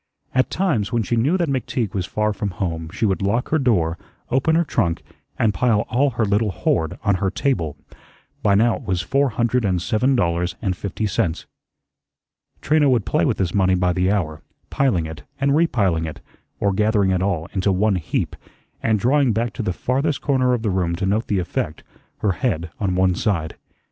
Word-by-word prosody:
At 130 0 +2
times, 145 - 0
when 120 -2 +1
she 120 - -1
knew 140 +11 +2
that 170 -2 0
McTeague 125 -5 -2
was 95 -3 -2
far 105 0 0
from 105 0 -3
home, 80 -3 -3
she 105 +3 -1
would 95 -2 0
lock 110 +5 0
her 160 - +2
door, 90 - +1 0.3
open 135 +5 +2
her 170 - +4
trunk, 90 - -1 0.3
and 110 -2 +2
pile 105 +2 +2
all 140 +4 +3
her 110 - +2
little 105 +2 +1
hoard 80 -3 -1
on 100 -3 +2
her 95 - +2
table. 90 - -1 0.6
By 100 -1 +3
now 115 +3 +3
it - - -12
was 90 -2 -1
four 140 +5 +2
hundred 120 +2 0
and 95 -3 +1
seven 120 +8 +1
dollars 85 -4 0
and 95 -5 -1
fifty 100 +3 -4
cents. 85 -5 -1 1.2
Trina 150 -1 +3
would 120 -6 +2
play 85 - +1
with - - +1
this 95 -3 -1
money 95 -2 +3
by 90 0 +1
the 90 +2 +1
hour, 80 -7 -1 0.3
piling 120 -12 +1
it, 80 -1 -7 0.2
and 140 +1 +2
repiling 100 - +2
it, 80 - -6 0.4
or 100 -1 +1
gathering 105 -1 +2
it 90 -1 +1
all 90 -5 0
into 95 0 +1
one 100 +1 +2
heap, 80 - -2 0.5
and 110 -2 +2
drawing 130 +1 +3
back 115 0 -1
to - - -4
the 100 - -1
farthest 135 - -1
corner 130 -3 +2
of 115 - -5
the 105 - +1
room 90 -2 0
to 95 +3 -2
note 105 +4 0
the 100 - 0
effect, 85 -3 -3 0.4
her 105 - +2
head 85 -5 -2
on 95 -3 0
one 95 0 +3
side. 85 -4 -1
105 Hz, 200 wpm, -21 LUFS, 90-125 Hz, 1.2 s, her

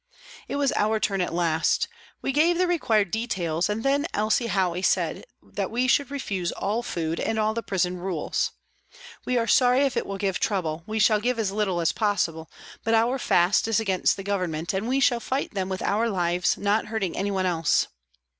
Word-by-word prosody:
It - - -4
was 280 -2 +1
our 215 +1 +1
turn 195 -3 0
at 180 - -1
last. 165 -1 +1 0.4
We - - 0
gave 325 +5 +3
the 365 - +3
required 225 - +1
details, 185 -7 -1
and 215 +2 -2
then 280 +3 +1
Elsie 215 +3 +1
Howey 185 -4 0
said - - 0 0.2
that - - -4
we 245 +3 0
should 275 +2 +2
refuse 200 -11 -3
all 210 +4 -2
food 165 -8 -3
and 225 - -1
all 215 0 +1
the 230 - -2
prison 180 -3 -1
rules. 180 -3 -2 0.4
" 485 -1 -18
We 250 - +1
are 230 - +1
sorry 250 +3 +4
if 275 -2 +1
it - - -1
will 195 - -4
give 195 -1 -1
trouble; 165 -6 -1
we 215 +1 -3
shall 215 0 +4
give 245 +3 0
as 215 -4 0
little 200 -4 0
as 165 - +2
possible; 175 -7 -1 0.3
but 225 +1 +2
our 240 +4 +2
fast 180 0 +3
is 225 -1 +2
against 195 -5 +1
the 195 - -6
Government, 180 -4 -2
and 195 +4 -2
we 265 +2 +1
shall 245 -3 +3
fight 265 +4 -3
them 190 -2 -2
with 190 0 -3
our 225 +3 +1
lives, 175 -3 +1
not 205 +2 0
hurting 210 -5 -2
anyone 195 -1 -1
else." 165 -3 +2
205 Hz, 200 wpm, -25 LUFS, 180-235 Hz, 0.4 s, sorry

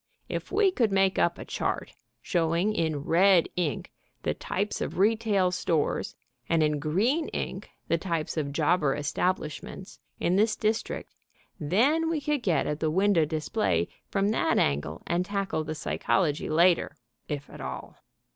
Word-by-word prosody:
If - - -5
we 400 -1 +4
could 230 - +1
make 195 -1 +2
up 175 - +2
a - - -8
chart, - - -3 0.3
showing 170 +3 +1
in 160 -7 -1
red 180 +2 +4
ink 175 -5 -2 0.3
the - - 0
types 205 +2 -3
of - - -3
retail 205 -2 +2
stores 165 -4 -1 0.3
and 165 -1 +3
in 150 -1 +1
green 215 - +1
ink - - -5 0.2
the 165 - +1
types 165 -3 -2
of 145 -3 -2
jobber 150 -1 +2
establishments, 180 +5 -3 0.2
in 180 +2 +1
this 215 +1 +3
district, 220 0 -2 0.5
then 260 - +2
we 325 -2 0
could 295 -1 -1
get 170 -10 +1
at 150 0 -2
the 155 - +1
window 190 -1 +3
display 100 - 0 0.2
from 195 0 +1
that 220 - +1
angle 75 +3 0
and 175 +1 0
tackle 195 -4 -2
the 155 +1 -5
psychology 155 -1 0
later, 165 -1 +3 0.3
if 145 -1 -4
at - - -11
all. - - -6
175 Hz, 155 wpm, -27 LUFS, 155-205 Hz, 0.5 s, we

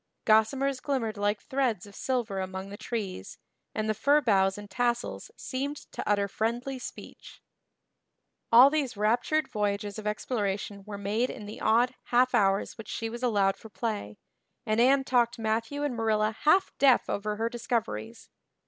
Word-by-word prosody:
Gossamers 255 +5 +3
glimmered 255 -6 -2
like 205 0 0
threads 255 -8 -1
of 200 - -14
silver 230 -5 -2
among 190 +1 -5
the - - -6
trees 200 - -5 0.4
and 215 0 -1
the 215 - +2
fir 280 +8 +3
boughs 195 -7 +2
and 205 0 -8
tassels 240 +2 -2
seemed 280 +3 -3
to - - -5
utter 200 -1 +2
friendly 240 +6 -2
speech. - - -10 1.1
All 250 +4 +9
these 285 -8 -1
raptured 240 +9 +1
voyages 205 0 -2
of 210 - -5
exploration 205 -2 -2
were 205 -1 -5
made 210 +5 0
in 215 - -7
the 205 - -9
odd 240 +3 +3
half 250 +1 +3
hours 195 +2 +1
which 225 - -9
she 225 0 -3
was 235 +1 -7
allowed 205 -6 +2
for 220 - -12
play, 210 - -4 0.5
and 215 0 +2
Anne 270 +2 +5
talked 240 -2 +2
Matthew 225 +6 -1
and 285 -4 -1
Marilla 215 -1 +1
half 370 +5 +4
deaf 270 -3 +5
over 210 +1 -2
her 225 +2 -1
discoveries. 230 - -3
225 Hz, 160 wpm, -28 LUFS, 205-250 Hz, 1.1 s, All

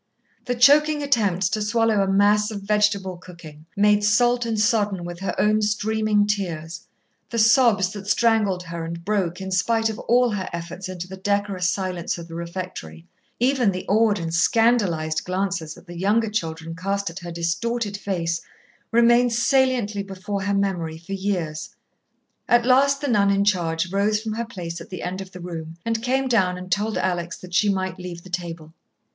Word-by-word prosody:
The 245 - -1
choking 295 +4 +5
attempts 205 -10 +1
to 215 - -2
swallow 225 -1 +2
a 195 - +1
mass 205 +2 +3
of 205 -3 -6
vegetable 200 -3 +1
cooking, 165 -4 -13
made 210 0 +4
salt 240 +3 +3
and 220 -2 -1
sodden 205 -5 +1
with 175 0 -7
her 195 - -3
own 215 +1 +3
streaming 210 0 +1
tears, 170 -6 -3 0.4
the 235 - -4
sobs 225 -4 +4
that 200 -1 -8
strangled 210 -4 +2
her 170 -1 -6
and 170 +1 -6
broke 190 -4 -1
in 190 0 -6
spite 225 +4 +1
of 215 - -8
all 245 0 +2
her 190 -3 -3
efforts 180 +2 -6
into 180 -1 -6
the 190 +1 -9
decorous 200 -2 0
silence 185 -3 -2
of 170 -1 -9
the 165 - -11
refectory, 170 - -7 0.3
even 250 -2 +3
the 185 0 -5
awed 215 0 +3
and 165 -2 -4
scandalized 170 -6 +2
glances 185 -3 -2
that - - -16
the 175 -2 -9
younger 210 +3 +1
children 165 -5 -4
cast 195 +1 -2
at 175 - -8
her 175 -2 -7
distorted 205 +6 -2
face, 170 -5 -2 0.5
remained 235 +1 +4
saliently 235 -4 +2
before 195 +1 -5
her 200 +1 0
memory 175 -5 -1
for 170 +4 -8
years. 180 -6 -3 0.7
At 240 0 +4
last 275 +2 +4
the 290 - -2
nun 205 -5 +3
in 200 0 +2
charge 175 -3 0
rose 205 +2 +1
from 220 0 -4
her 235 +2 -3
place 170 -6 -7
at - - -11
the 185 -3 -7
end 185 +2 -4
of 190 -1 -9
the 180 - -10
room 165 -2 -7
and 225 -1 -1
came 260 +2 0
down 190 -7 +2
and 180 0 -9
told 210 +3 0
Alex 175 -1 -2
that 180 -1 -12
she 205 +3 +3
might 190 -2 -2
leave 175 -2 -7
the 185 - -13
table. 165 -3 -5
195 Hz, 185 wpm, -23 LUFS, 175-220 Hz, 0.7 s, choking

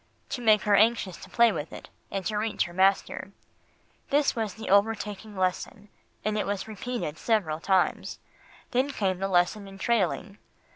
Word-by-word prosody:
"To 250 - -4
make 215 -2 +4
her 210 - +2
anxious 215 -3 +3
to - - -12
play 235 -1 +5
with 155 -5 -5
it, - - -9 0.2
and 195 -2 -4
to 215 - -1
reach 215 +1 0
her 175 - -8
master. 190 +2 +1 0.8
This 285 0 +2
was 220 -4 -2
the 220 - -8
overtaking 210 0 +1
lesson, 195 +3 -2 0.4
and 215 0 0
it - - -1
was 200 0 -2
repeated 220 -7 -4
several 185 -9 0
times, 190 +1 +1 0.5
then 260 +3 +1
came 190 -9 -1
the 195 - 0
lesson 195 +2 +1
in 195 0 -11
trailing. 200 -1 0
205 Hz, 165 wpm, -27 LUFS, 190-225 Hz, 0.8 s, play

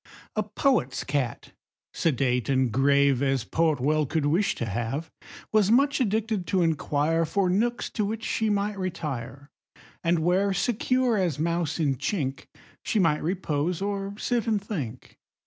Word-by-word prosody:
A 215 - +2
poet's 210 - 0
cat, 140 -4 -2 0.4
sedate 125 -6 0
and 130 -3 +2
grave 140 +1 +3
As 135 -3 +1
poet 160 +2 +1
well 150 +3 +1
could 155 +1 0
wish 170 +8 +2
to 115 - -3
have, 120 - -3 0.4
Was 215 -2 +3
much 275 +4 +3
addicted 215 -4 0
to 185 -3 +2
inquire 160 0 +1
For 185 +3 +1
nooks 235 +5 0
to 215 - -1
which 220 +2 -3
she 220 -1 0
might 205 0 -1
retire, 140 -6 -5 0.5
And 170 +1 +2
where, 190 +3 +2
secure 245 +3 +1
as 175 -7 0
mouse 170 0 -1
in 140 -5 +1
chink, 135 - -2 0.4
She - - -1
might 165 -6 +3
repose, 165 -1 -1
or 200 0 -3
sit 235 0 -1
and 215 -2 +2
think. 145 - -6
165 Hz, 150 wpm, -26 LUFS, 140-205 Hz, 0.5 s, grave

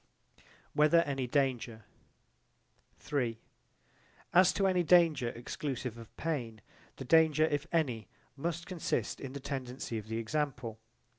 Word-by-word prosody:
Whether 155 +3 +5
any 135 -4 -2
danger 125 -4 0 2.5
As 180 +1 +7
to 195 - +1
any 185 -2 +3
danger 165 -7 +4
exclusive 125 0 -4
of 115 -1 -13
pain, 120 -9 -3 0.3
the 135 - -7
danger, 160 +1 +5
if 145 0 -1
any, 130 -10 0 0.3
must 170 +3 -3
consist 180 -4 -2
in 135 -1 -7
the 140 - -5
tendency 130 -4 -4
of 105 - -11
the 110 0 -3
example. 120 -2 -2
140 Hz, 120 wpm, -32 LUFS, 120-160 Hz, 2.5 s, As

